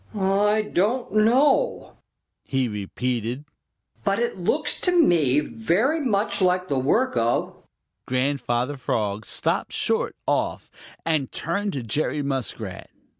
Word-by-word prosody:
"I 205 +2 +2
don't 215 +6 0
know," 270 - +3 0.5
he 135 -2 0
repeated, 120 +5 -3 0.6
"but - - +1
it 475 0 -1
looks - - -1
to 360 - +2
me 165 - +4
very 170 - 0
much 205 -5 0
like 180 0 +2
the 140 - +1
work 240 - +1
of 115 +1 0 0.3
" 95 +6 -56
Grandfather 130 0 0
Frog 110 -4 -2
stopped - - 0
short - - 0
off - - -1 0.3
and 155 -5 0
turned 200 +5 -2
to 135 - -3
Jerry 145 +5 -1
Muskrat. 135 -5 -4
150 Hz, 125 wpm, -24 LUFS, 125-210 Hz, 0.6 s, me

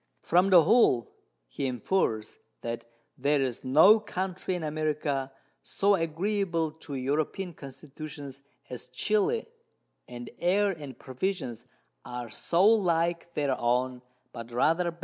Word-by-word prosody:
From 180 +3 +3
the 175 -4 +8
whole 155 - +4 0.4
he 95 - -3
infers, 125 - -1 0.2
that 115 0 -4 0.3
there 145 +2 +2
is 130 -3 -2
no 160 +12 +7
Country 185 -2 -3
in 175 - -4
America 150 -3 -1 0.3
so 200 +1 +1
agreeable 170 -1 0
to 155 -2 -8
European 150 +7 -2
Constitutions 140 0 -9 0.3
as 125 0 -6
Chili, 215 - 0 0.6
and 120 0 -8
Air 195 +3 +2
and 145 -8 -8
Provisions 130 - -4 0.4
are 120 -2 -6
so 175 - +1
like 170 -5 +2
their 140 -3 +1
own, 125 +1 0 0.3
but 115 -1 -8
rather 165 +9 +2
better. 170 - -10
155 Hz, 125 wpm, -28 LUFS, 130-180 Hz, 0.6 s, the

